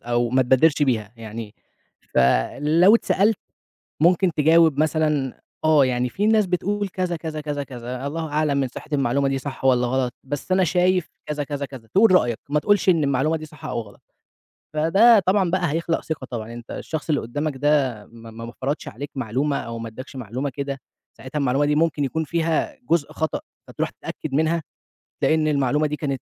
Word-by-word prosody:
أو 120 0 0
ما 130 0 +3
تبادرش 135 +5 +3
بيها 115 -6 0
يعني 110 -1 -8 0.6
فلو 150 - +4
اتسألت، 215 -2 +2 0.6
ممكن 175 +2 +4
تجاوب 160 -1 +4
مثلًا 150 -4 0 0.2
آه 155 -3 +5
يعني 125 -1 0
في 205 - -1
ناس 220 -1 +4
بتقول 200 +3 -1
كذا، 180 -1 -2
كذا، 155 -1 -5
كذا، 145 -1 -3
كذا، 125 0 -6
الله 160 +2 -3
أعلم 150 -1 0
من 135 -1 +1
صحة 130 - -10
المعلومة 140 0 +1
دي 135 - 0
صح 135 0 -6
والّا 125 -2 +4
غلط، 130 -1 0
بس 145 +6 -5
أنا 185 0 +4
شايف 180 0 +2 0.2
كذا، 150 -1 -2
كذا، 140 0 -4
كذا، 130 -5 -11
تقول 200 - +4
رأيك 120 -11 +3
ما 150 - +2
تقولش 205 +3 +2
إن 165 -4 +4
المعلومة 140 +4 +1
دي 155 - -8
صح 155 -2 -13
أو - - -2
غلط. 100 -2 -15 0.7
فده 195 +9 +5
طبعًا 185 -1 +1
بقى 180 -4 +1
هيخلق 165 +1 -1
ثقة 155 -4 -4
طبعًا، 115 -2 -5
أنت 120 0 -10
الشخص 160 0 -5
اللي 150 - +2
قدامك 145 +5 -3
ده، 135 -7 +1
ما 115 -1 -13
ما 115 +1 -8
ما 115 - -8
فرضش 140 +3 -2
عليك 140 +7 -7
معلومة 135 +3 -1
أو 115 0 -5
ما 115 - -5
اداكش 130 +5 -10
معلومة 130 +3 -4
كده، 140 +1 -5 0.4
ساعتها 130 +3 -5
المعلومة 140 +1 +2
دي 150 0 +1
ممكن 155 -2 +1
يكون 160 +4 -1
فيها 165 - -1
جزء 165 -3 +1
خطأ، 160 0 -2 0.3
فتروح - - -3
تتأكد 155 - -7
منها، 160 +3 +1 0.6
تلاقي 155 - +4
إن 155 -1 +1
المعلومة 145 +1 +2
دي 150 - -3
كانت 140 -4 -3
145 Hz, 185 wpm, -23 LUFS, 130-160 Hz, 0.7 s, آه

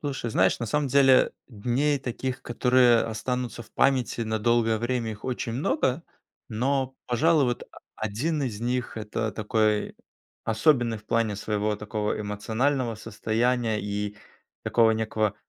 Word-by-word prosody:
Слушай, 135 -5 -3
знаешь, 95 -3 +3
на 115 - -2
самом 145 +5 0
деле 135 -1 +5 0.2
дней 130 +6 0
таких, 130 +1 -4
которые 125 -1 +4
останутся 120 +2 -3
в 105 - -20
памяти 130 -3 +1
на 110 -1 -1
долгое 115 0 +2
время, 120 0 -1
их 105 -1 -9
очень 125 -2 -3
много. 130 +3 0 0.5
Но, 130 +3 -1
пожалуй, 150 +5 +3
вот 120 -1 -2
а - - -17 0.2
а - - -11
один 140 +9 -1
из 115 -5 -3
них- 125 0 -2
это 110 0 -3
такой 110 0 0 0.5
особенный 115 0 +2
в 105 - -20
плане 115 -3 +1
своего 105 +1 -1
такого 105 0 -3
эмоционального 115 +5 -1
состояния 110 +1 -1
и 105 0 -3 0.5
такого 115 -1 +4
некого 110 -2 0
115 Hz, 145 wpm, -26 LUFS, 110-130 Hz, 0.5 s, деле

